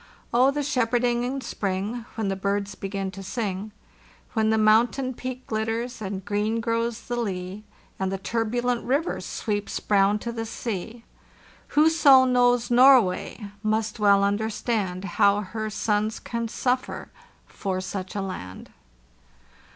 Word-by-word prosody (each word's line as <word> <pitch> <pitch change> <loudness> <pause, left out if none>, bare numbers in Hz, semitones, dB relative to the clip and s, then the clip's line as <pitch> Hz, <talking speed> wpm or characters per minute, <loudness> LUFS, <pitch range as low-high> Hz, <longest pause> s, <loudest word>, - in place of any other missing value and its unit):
Oh, 250 +3 +5
the 290 +1 -1
shepherding 245 -3 +1
in 265 +2 -2
spring, 205 +3 -3
When 220 -3 -2
the 195 - 0
birds 200 +1 -1
begin 195 -1 -4
to 195 +1 -9
sing, 200 0 -3 0.6
When 220 -2 +2
the 220 - +3
mountain 230 +5 +3
peak 255 +1 -6
glitters 225 +2 -2
and 195 -2 -5
green 210 +2 0
grows 230 0 -1
the 245 - -4
lea, 195 -3 -4 0.4
And 190 0 -1
the 195 - -1
turbulent 235 +4 -1
river 280 +7 0
sweeps 205 -2 -3
brown 200 0 +3
to 235 +3 -5
the 225 -1 -4
sea!.. 225 +1 -5 0.7
Whoso 295 -4 +7
knows 245 -1 +3
Norway 240 -4 +4 0.2
must 220 0 -1
well 200 -1 +5
understand 205 -2 -1
How 200 +1 +3
her 215 +2 -4
sons 215 +1 -1
can 235 -1 -3
suffer 250 +3 -2 0.3
for 190 -2 -3
such 185 0 -5
a 200 - -1
land." 95 - -7
220 Hz, 135 wpm, -25 LUFS, 200-240 Hz, 0.7 s, Whoso